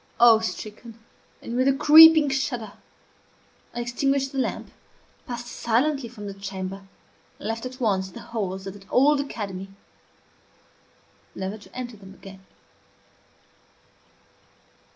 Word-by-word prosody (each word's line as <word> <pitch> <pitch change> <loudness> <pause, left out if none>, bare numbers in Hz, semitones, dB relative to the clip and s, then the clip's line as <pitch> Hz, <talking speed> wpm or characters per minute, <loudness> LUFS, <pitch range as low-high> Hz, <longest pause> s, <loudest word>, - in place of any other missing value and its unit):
Awe 235 -2 +7
stricken, 225 +1 -7 0.5
and 235 - -5
with 255 +2 +2
a 275 - +4
creeping 315 +1 +8
shudder, 245 -6 -2 1.0
I 240 - -2
extinguished 270 +3 -1
the 270 - -3
lamp, - - -3 0.6
passed 240 -1 -5
silently 240 +3 -1
from 215 -3 -10
the 200 - -6
chamber, 195 0 -7 0.5
and - - -7
left, 225 +2 -3
at 255 +1 -12
once, 195 -6 0
the - - -11
halls 190 -4 -5
of 195 - -6
that 195 -1 -16
old 285 +3 +4
academy, 195 -8 -6 1.7
never 190 +2 -4
to - - -18
enter 245 -3 -6
them 195 -1 -14
again. 195 -1 -13
230 Hz, 125 wpm, -24 LUFS, 195-260 Hz, 1.7 s, creeping